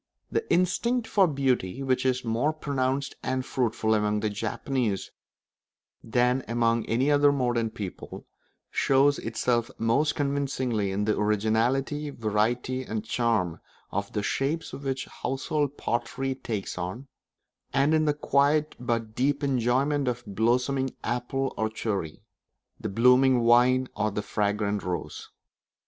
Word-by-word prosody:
The 450 - -2
instinct 225 +7 +2
for 195 -3 +4
beauty, 135 - 0
which 130 0 +1
is 130 -1 0
more 120 +7 +1
pronounced 135 -2 -1
and 130 0 -2
fruitful 115 -4 0
among 105 0 +1
the 105 0 -1
Japanese 110 0 -2 0.9
than 125 +3 +1
among 115 -1 +1
any 130 +6 +2
other 145 0 +5
modern 120 -4 0
people, 105 -5 -7 0.5
shows 140 +1 +3
itself 120 +1 0
most 135 +7 +1
convincingly 135 -7 -1
in 100 +2 -1
the 110 - +2
originality, 115 +8 +1
variety, 120 +2 -1
and 110 -3 -4
charm 110 -8 0 0.3
of 100 +1 -3
the 105 - -1
shapes 150 +9 -1
which 135 -1 -3 0.2
household 145 +2 -1
pottery 130 +3 -2
takes 110 -8 -5
on, 95 +10 -5 0.6
and 140 +3 +3
in 155 0 +3
the 150 -1 +2
quiet 150 +1 +2
but 115 -3 -2
deep 140 +4 0
enjoyment 135 +2 +1
of 125 -1 -2
the - - -10
blossoming 125 +5 +1
apple 125 +3 -2
or 110 0 0
cherry, 100 -7 -4 0.6
the - - -4
blooming 125 +3 +4
vine 125 +2 +5
or 110 - 0
the 105 0 -3
fragrant 105 -1 -1
rose. 90 0 -5
125 Hz, 130 wpm, -27 LUFS, 110-135 Hz, 0.9 s, other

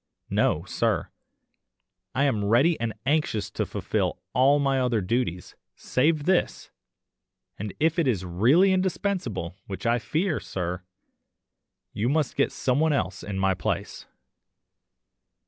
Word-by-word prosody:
No, - - +2
sir. - - -1 1.1
I 135 - +2
am 115 -8 +1
ready 135 +11 +4
and 115 -1 -1
anxious 140 -8 0
to - - -2
fulfil - - -2
all 135 +4 +5
my 135 -2 +1
other 125 -3 +1
duties, 100 -3 -2 0.2
save 150 +3 +1
this, 185 -1 0 0.9
and 105 0 -4
if 160 +3 +2
it 160 - +2
is 100 -8 0
really 125 - +4
indispensable, 185 - -1
why 95 - -5
I 120 +1 +3
fear, 160 - -1
sir, 90 -1 -4 1.1
you 115 +4 0
must 150 -1 0
get - - +2
someone 145 +4 +1
else 95 -8 -2
in 100 -1 -5
my 95 0 +2
place. - - -4
125 Hz, 130 wpm, -26 LUFS, 100-155 Hz, 1.1 s, all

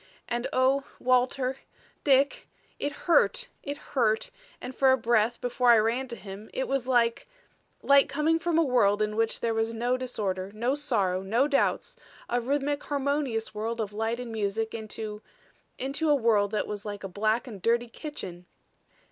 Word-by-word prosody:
"And, 240 +2 -2
O 265 +2 +3 0.2
Walter 255 +1 +1 0.5
Dick 275 0 +3 0.3
it 290 - -1
hurt - - +3
it 285 0 -5 0.2
hurt 220 -5 +1 0.3
and 250 +1 -7
for 265 -1 +5
a 260 - +4
breath 235 -1 +2
before 245 0 +1
I 235 - +8
ran 230 +5 +1
to 235 - -6
him 205 0 -10
it 265 - -1
was 270 -2 -1
like 235 -2 +2 0.6
like 280 0 +5
coming 300 +4 +1
from 335 -1 0
a 330 - +5
world 215 -7 +3
in 210 0 -2
which 225 0 0
there 230 -1 0
was 225 +1 -1
no 245 +3 0
disorder, 200 -7 -3
no 240 +4 0
sorrow, 205 -11 0
no 230 +8 +2
doubts, 280 -2 0 0.3
a 245 0 +1
rhythmic, 285 +3 -1
harmonious 280 -6 -1
world 225 +2 -3
of 210 -2 -3
light 225 +3 -1
and 245 -2 -6
music, 220 +1 -2
into 215 -1 -6 0.6
into 280 +4 -1
a 295 - +6
world 220 -6 +3
that 210 0 -1
was 205 -1 -5
like 205 -1 -6
a - - -3
black 215 +5 0
and 215 -7 -9
dirty 235 +3 +2
kitchen. 190 - -8
235 Hz, 175 wpm, -28 LUFS, 215-270 Hz, 0.6 s, I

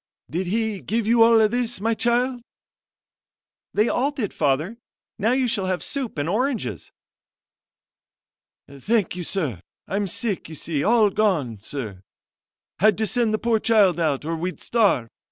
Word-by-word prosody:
"Did 175 +4 -2
he 220 0 -1
give 225 +1 -1
you 230 +1 +3
all 225 -1 +6
this, 240 0 -2
my 225 +3 +1
child?" 245 +2 +1 1.3
"They 210 +3 +3
all 265 +4 +1
did, 265 -9 -4
Father; 155 +11 0 0.4
now 225 +4 +2
you 260 -1 +1
shall 200 -5 -1
have 185 -1 -1
soup 265 - -4
and 145 +1 -1
oranges." 245 +5 -2 1.8
"Thank 185 - -1
you, 180 - -4
sir 150 - -2 0.3
I'm 200 +1 -1
sick, 225 -4 -3
you 160 - -8
see 150 -1 -2
all 220 -2 +4
gone, 160 - 0
sir! 110 -6 -6 0.8
had 215 +2 +4
to 220 - 0
send 235 +1 +1
the 215 - +1
poor 230 0 +1
child 205 -7 +3
out, 150 -4 0
or 165 +1 -2
we'd 180 +3 -4
starve. 205 - +2
210 Hz, 155 wpm, -23 LUFS, 170-230 Hz, 1.8 s, all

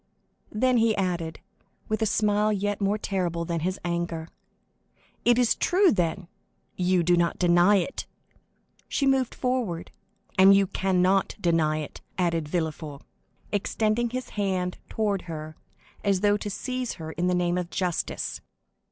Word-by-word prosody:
Then 250 +3 +2
he 225 -1 +3
added, 175 -4 -2 0.5
with 215 +1 -1
a 220 - +3
smile 210 0 +2
yet 205 0 -1
more 200 +1 +2
terrible 175 -5 -2
than 170 -1 -2
his 185 +4 -2
anger, 170 -1 -2 1.0
"It 240 0 +5
is 245 -2 +4
true, 375 +2 +3
then; 175 -1 -1 0.5
you 180 -1 +2
do 175 +1 +4
not 170 0 +1
deny 175 +3 +5
it!" 200 +8 -1 0.8
She 280 - 0
moved 270 -2 +2
forward. 245 -10 -2 0.5
"And 195 +1 +8
you 195 0 +4
cannot 190 0 +1
deny 160 -4 +1
it!" 150 - -8 0.2
added 165 -4 0
Villefort, 155 -3 -3 0.5
extending 215 +3 0
his 255 +1 -5
hand 185 -3 -2
toward 205 -3 0
her, 155 -1 -6 0.5
as 200 -3 +2
though 205 0 +4
to 205 0 -4
seize 255 +3 -3
her 160 -2 -7
in 175 +2 -1
the 180 - +2
name 175 0 +1
of 175 -1 -4
justice. 180 -3 -2
185 Hz, 145 wpm, -26 LUFS, 170-215 Hz, 1.0 s, And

